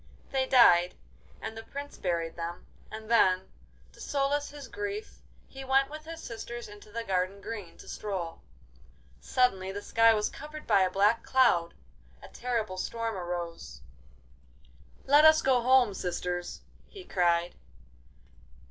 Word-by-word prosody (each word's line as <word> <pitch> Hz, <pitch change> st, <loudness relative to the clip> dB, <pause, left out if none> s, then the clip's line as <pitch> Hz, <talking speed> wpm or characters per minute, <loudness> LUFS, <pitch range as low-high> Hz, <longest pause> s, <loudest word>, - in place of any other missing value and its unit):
They 265 Hz, -1 st, 0 dB
died, 180 Hz, -9 st, +6 dB, 0.5 s
and 220 Hz, -, -5 dB
the 225 Hz, -, -7 dB
Prince 285 Hz, +5 st, -8 dB
buried 170 Hz, -3 st, -2 dB
them, 170 Hz, 0 st, -6 dB, 0.3 s
and 220 Hz, 0 st, -8 dB
then, 190 Hz, -5 st, +3 dB, 0.4 s
to -, -, -15 dB
solace 285 Hz, +1 st, -1 dB
his 285 Hz, -2 st, -10 dB
grief, 410 Hz, +1 st, -6 dB, 0.3 s
he 270 Hz, 0 st, -9 dB
went 270 Hz, +1 st, +2 dB
with 310 Hz, 0 st, -8 dB
his 330 Hz, 0 st, -8 dB
sisters 235 Hz, +1 st, -7 dB
into 205 Hz, 0 st, -14 dB
the 230 Hz, +2 st, -4 dB
garden 190 Hz, -1 st, -1 dB
green 205 Hz, -4 st, -8 dB
to -, -, -14 dB
stroll. 185 Hz, -5 st, -5 dB, 0.8 s
Suddenly 190 Hz, -, +1 dB
the 200 Hz, +1 st, -6 dB
sky 225 Hz, 0 st, +4 dB
was 210 Hz, 0 st, 0 dB
covered 305 Hz, +1 st, -9 dB
by 200 Hz, -3 st, +4 dB
a 185 Hz, -, +3 dB
black 205 Hz, +5 st, +3 dB
cloud; 175 Hz, -11 st, +2 dB, 0.5 s
a -, -, -10 dB
terrible 230 Hz, -6 st, -3 dB
storm 230 Hz, +3 st, -3 dB
arose. 175 Hz, -, -6 dB, 1.2 s
'Let 290 Hz, +2 st, +6 dB
us 315 Hz, 0 st, +7 dB
go 260 Hz, -2 st, +3 dB
home, 250 Hz, -3 st, +4 dB
sisters!' 180 Hz, -1 st, -4 dB, 0.3 s
he 390 Hz, -3 st, -12 dB
cried. 175 Hz, -, +1 dB
220 Hz, 140 wpm, -29 LUFS, 180-265 Hz, 1.2 s, us